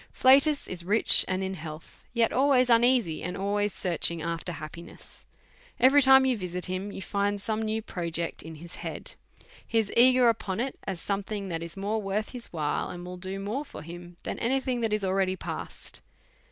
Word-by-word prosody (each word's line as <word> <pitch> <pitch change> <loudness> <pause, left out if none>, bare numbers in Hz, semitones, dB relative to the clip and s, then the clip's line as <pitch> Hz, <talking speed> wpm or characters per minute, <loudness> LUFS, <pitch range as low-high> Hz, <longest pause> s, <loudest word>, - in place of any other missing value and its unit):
Flatus 280 +3 +4
is 175 -2 -4
rich 205 +5 +5
and 185 0 -1
in 190 0 -3
health, 155 -2 -10
yet 235 -1 +1
always 255 -2 +4
uneasy, 235 -8 +3
and 180 +2 -4
always 205 +1 0
searching 170 -2 +2
after 170 +2 -4
happiness. 155 +2 -11 0.5
Every 270 +4 +6
time 265 0 +7
you 260 -1 +2
vi 185 -5 -4
sit 180 +1 -5
him 185 +2 -4
you 195 - -7
find 200 +2 -1
some 215 +2 -2
new 220 0 -2
project 170 -4 -4
in 160 0 -9
his 170 +3 -10
head, - - -6 0.5
he 230 - 0
is 220 -3 +1
eager 250 +1 +6
upon 215 -3 0
it, 260 +2 -2
as 190 -3 -3
something 200 +1 -3
that 165 -1 -3
is 170 +2 -7
more 210 +3 -1
worth 205 +2 -2
his 245 -2 -8
while, 150 -3 -2
and 175 0 -7
will 180 0 -7
do 190 +2 -4
more 215 +9 -3
for - - -10
him 175 +1 -10
than - - -4
any 260 +4 +1
thing 255 -2 -2
that 225 -2 0
is 210 -1 0
already 190 0 +1
past. - - -7
200 Hz, 195 wpm, -27 LUFS, 175-235 Hz, 0.5 s, time